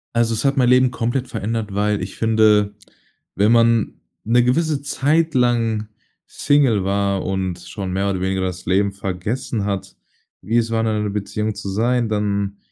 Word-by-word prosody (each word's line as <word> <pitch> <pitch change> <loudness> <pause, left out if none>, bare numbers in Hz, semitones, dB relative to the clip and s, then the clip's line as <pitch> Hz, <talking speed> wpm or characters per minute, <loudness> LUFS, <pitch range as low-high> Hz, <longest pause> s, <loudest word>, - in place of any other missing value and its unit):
Also, 115 -1 +2
es 110 - -3
hat 140 +1 +2
mein 125 -2 +4
Leben 125 0 +4
komplett 125 +2 -2
verändert, 110 -1 -3
weil 105 +1 0
ich 95 +1 -7
finde, 110 -2 +3 0.6
wenn 105 +3 +3
man 115 -1 +3 0.3
'ne 120 +2 +3
gewisse 145 +3 0
Zeit 155 +3 +1
lang 115 -4 +1 0.4
Single 135 -9 +2
war 100 0 0
und 95 -2 -2
schon 95 -3 -6
mehr 100 +2 0
oder 95 -2 -3
weniger 95 0 -1
das 90 -1 -4
Leben 100 +2 +2
vergessen 100 +4 -3
hat, 100 -2 -4 0.4
wie 110 +5 0
es 115 -1 +1
war, 115 0 0
in 115 - 0
einer 105 -1 -1
Beziehung 105 +1 -3
zu 100 -1 -7
sein, 115 +3 0
dann 100 -1 -1
105 Hz, 170 wpm, -20 LUFS, 100-120 Hz, 0.6 s, mein